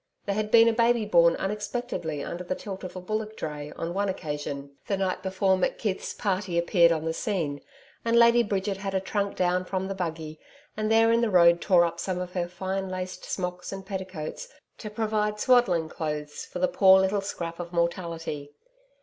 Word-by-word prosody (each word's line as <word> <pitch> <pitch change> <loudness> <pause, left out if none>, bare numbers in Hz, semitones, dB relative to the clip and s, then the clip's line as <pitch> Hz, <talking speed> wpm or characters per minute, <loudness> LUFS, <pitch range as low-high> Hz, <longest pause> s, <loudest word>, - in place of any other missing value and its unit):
There 200 - 0
had 210 +1 -1
been 230 +1 +7
a 230 - +4
baby 230 -1 +3
born 170 -4 +5
unexpectedly 205 - -3
under 175 +1 -5
the 180 +1 -3
tilt 195 -1 -7
of 185 - -7
a - - -4
bullock 215 +3 -3
dray, 150 -1 -5
on 165 +1 -4
one 200 +1 0
occasion, 145 -5 -4 0.2
the 200 - 0
night 190 -1 -1
before 190 0 +1
McKeith's 190 +1 -2
party 190 -3 -1
appeared 170 0 +4
on 160 -1 -1
the 160 - 0
scene, 165 -8 -2 0.4
and 230 0 +2
Lady 235 0 +6
Bridget 200 -2 -1
had 195 0 -4
a - - +3
trunk 200 +1 -2
down 180 0 +1
from 190 +1 -3
the 195 - -3
buggy, 160 -4 -5 0.4
and 215 0 -1
there 225 0 +5
in 230 0 +3
the 235 - +2
road 170 -2 +5
tore 180 -4 +5
up 170 0 -4
some 185 0 -2
of 180 0 -5
her 175 -2 -1
fine 190 +2 -3
laced 185 0 -5
smocks 180 -1 -4
and 195 -1 -7
petticoats 190 - -5 0.3
to 215 - -6
provide 210 -1 -1
swaddling 230 -11 +3
clothes 150 -2 -5
for - - -7
the 185 +1 +2
poor 190 0 +6
little 190 +1 +1
scrap 170 -4 -5
of 175 -1 -6
mortality. 170 -4 -3
185 Hz, 195 wpm, -27 LUFS, 170-205 Hz, 0.4 s, been